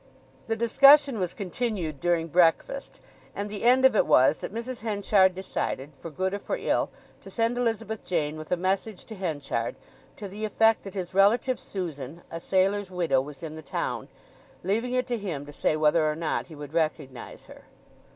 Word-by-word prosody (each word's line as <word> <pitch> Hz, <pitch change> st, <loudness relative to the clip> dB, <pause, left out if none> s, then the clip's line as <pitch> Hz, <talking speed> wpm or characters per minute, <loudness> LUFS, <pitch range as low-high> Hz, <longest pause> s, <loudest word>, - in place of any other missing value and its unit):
The 225 Hz, -, 0 dB
discussion 275 Hz, +2 st, +6 dB
was 180 Hz, -2 st, -1 dB
continued 190 Hz, -, -3 dB
during 170 Hz, -1 st, +1 dB
breakfast, 180 Hz, -, +1 dB, 0.4 s
and 205 Hz, +1 st, -4 dB
the 210 Hz, -, -5 dB
end 255 Hz, +2 st, +5 dB
of 265 Hz, -, +5 dB
it -, -, +3 dB
was 130 Hz, +4 st, +5 dB
that -, -, -6 dB
Mrs. 235 Hz, +3 st, -5 dB
Henchard 200 Hz, -3 st, +2 dB
decided, 155 Hz, -6 st, -4 dB
for 165 Hz, -, -7 dB
good 185 Hz, +5 st, -2 dB
or 200 Hz, -, -2 dB
for -, -, -3 dB
ill, -, -, 0 dB, 0.3 s
to -, -, -12 dB
send 230 Hz, +1 st, 0 dB
Elizabeth 225 Hz, -3 st, -2 dB
Jane 155 Hz, -4 st, -1 dB
with 155 Hz, 0 st, -9 dB
a 180 Hz, -, +2 dB
message 190 Hz, +3 st, -2 dB
to 220 Hz, -, -9 dB
Henchard, 145 Hz, -, -3 dB, 0.4 s
to 205 Hz, -, -6 dB
the 205 Hz, +3 st, -8 dB
effect 220 Hz, +1 st, +2 dB
that 195 Hz, -, -8 dB
his 185 Hz, -2 st, -4 dB
relative 225 Hz, +6 st, +3 dB
Susan, 165 Hz, -5 st, -6 dB
a 165 Hz, -, -5 dB
sailor's 195 Hz, +2 st, +1 dB
widow, 170 Hz, -7 st, +1 dB
was 145 Hz, +3 st, -10 dB
in 155 Hz, -1 st, -6 dB
the 160 Hz, -, -8 dB
town; 140 Hz, -, -3 dB, 0.6 s
leaving 225 Hz, +7 st, -1 dB
it 255 Hz, 0 st, +1 dB
to 240 Hz, -2 st, -2 dB
him 165 Hz, -9 st, -4 dB
to 145 Hz, -, -11 dB
say 155 Hz, -, 0 dB
whether 155 Hz, 0 st, +3 dB
or 150 Hz, -, -2 dB
not 160 Hz, 0 st, -2 dB
he 160 Hz, -, -11 dB
would 145 Hz, 0 st, -9 dB
recognize 155 Hz, -6 st, -3 dB
her. -, -, -15 dB
190 Hz, 190 wpm, -27 LUFS, 160-225 Hz, 0.6 s, discussion